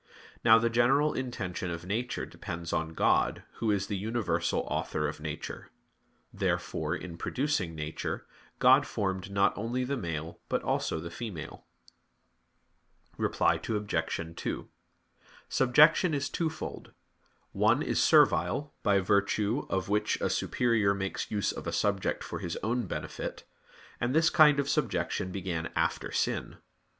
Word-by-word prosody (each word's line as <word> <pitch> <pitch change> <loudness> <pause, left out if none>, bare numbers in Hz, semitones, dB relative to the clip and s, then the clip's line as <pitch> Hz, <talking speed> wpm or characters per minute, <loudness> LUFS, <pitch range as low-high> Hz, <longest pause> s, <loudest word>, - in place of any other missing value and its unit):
Now 110 0 +8
the 115 +1 +2
general 135 +6 +3
intention 100 -9 -3
of 85 0 -5
nature 115 +6 -2
depends 85 -4 -6
on 80 0 -1
God, - - +2
Who 115 - -1
is 100 -2 +1
the 100 - -3
universal 110 +2 0
Author 75 0 -2
of 75 +1 -5
nature. 75 -1 -6 0.6
Therefore, - - -1
in 85 -2 -8
producing 130 - -1
nature, 75 0 -4 0.3
God - - +6
formed 95 -1 -2
not 100 0 +2
only 120 +4 -2
the 140 +2 -2
male 80 -4 -4
but - - 0
also 80 - 0
the 85 +1 -7
female. 85 -8 -7 1.5
Reply - - +2
Obj. 100 -6 -2
2: - - -4 0.8
Subjection 150 +6 +5
is 140 0 -1
twofold. 160 -2 -4 0.6
One - - +3
is - - +1
servile, 145 0 +4
by 100 -1 +3
virtue 100 +6 +1
of 95 -1 -1
which 105 +1 +1
a - - 0
superior 115 -5 +2
makes 95 0 -3
use 105 -2 0
of - - -7
a - - -1
subject 100 -2 0
for - - -5
his 85 - -4
own 120 +3 0
benefit; - - -5 0.6
and 125 +3 0
this 160 0 +4
kind 150 -3 +6
of 140 - 0
subjection 95 - -1
began 90 -3 -3
after - - 0
sin. - - -1
100 Hz, 140 wpm, -30 LUFS, 90-125 Hz, 1.5 s, Now